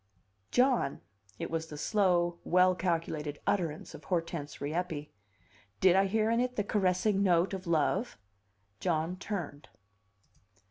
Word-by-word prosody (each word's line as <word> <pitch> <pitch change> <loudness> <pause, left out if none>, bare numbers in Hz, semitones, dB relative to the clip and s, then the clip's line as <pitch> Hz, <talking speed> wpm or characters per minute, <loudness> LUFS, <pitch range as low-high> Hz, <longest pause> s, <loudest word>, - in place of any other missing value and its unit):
"John!" 250 - +2 0.4
It - - -5
was 160 0 -2
the 150 - -8
slow, 175 -2 +1
well 185 +1 +4
calculated 165 -4 -2
utterance 165 -6 -1
of - - -11
Hortense 165 -5 -3
Rieppe. 155 0 -3 0.7
Did 185 -1 +5
I 195 +1 +4
hear 220 +2 +1
in 230 - +2
it 250 0 0
the 205 - 0
caressing 195 0 +1
note 180 -1 +3
of 190 -1 -5
love? 170 - +1 0.6
John 165 0 0
turned. 175 -8 -5
180 Hz, 130 wpm, -31 LUFS, 160-195 Hz, 0.7 s, Did